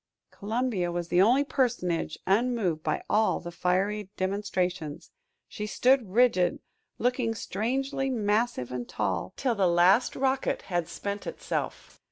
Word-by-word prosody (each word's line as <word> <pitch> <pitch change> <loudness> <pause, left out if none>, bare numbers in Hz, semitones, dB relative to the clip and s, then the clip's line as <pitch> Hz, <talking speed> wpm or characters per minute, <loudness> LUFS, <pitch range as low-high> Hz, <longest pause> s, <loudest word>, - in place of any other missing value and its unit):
Columbia 215 -4 -1
was 175 0 -3
the 175 +1 +4
only 245 +8 +5
personage 230 - -1
unmoved 200 -5 +1
by 155 -1 -1
all 215 +1 +2
the 175 - -7
fiery 190 +4 0
demonstrations; 185 -5 -2 0.4
she 210 -1 -5
stood 250 -1 +3
rigid, 220 -5 +3 0.4
looking 245 -2 0
strangely 265 +7 -2
massive 215 - 0
and 125 -1 -5
tall, - - -2
till 255 -3 +1
the 200 -4 +2
last 180 +7 +4
rocket 265 0 0
had 175 -3 -2
spent 200 +3 -5
itself. - - -4
205 Hz, 130 wpm, -28 LUFS, 180-245 Hz, 0.4 s, only